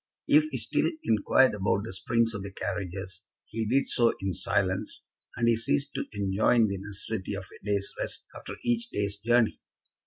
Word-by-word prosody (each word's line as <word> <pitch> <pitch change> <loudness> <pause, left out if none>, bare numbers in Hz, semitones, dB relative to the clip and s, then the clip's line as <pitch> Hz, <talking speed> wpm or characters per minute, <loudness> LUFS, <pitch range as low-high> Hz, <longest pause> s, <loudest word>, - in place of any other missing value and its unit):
If 300 +1 +6
he - - -3
still - - +1
inquired 115 +4 +4
about 100 0 0
the 110 - -6
springs 115 +4 +1
of 105 - -4
the 100 0 -6
carriages, 95 -1 -4 0.2
he 110 -1 -3
did 135 +5 +2
so 120 -2 +3
in 95 -1 -2
silence, 95 +1 -1 0.3
and 115 0 +1
he 115 - +5
ceased 70 -11 0
to - - -2
enjoin 100 +3 +2
the 100 - -2
necessity 100 0 -3
of 100 - -5
a - - -15
day's 100 -1 +1
rest - - -3
after - - -7
each 235 0 0
day's 100 - -1
journey. 120 +2 +2
105 Hz, 180 wpm, -28 LUFS, 95-115 Hz, 0.3 s, If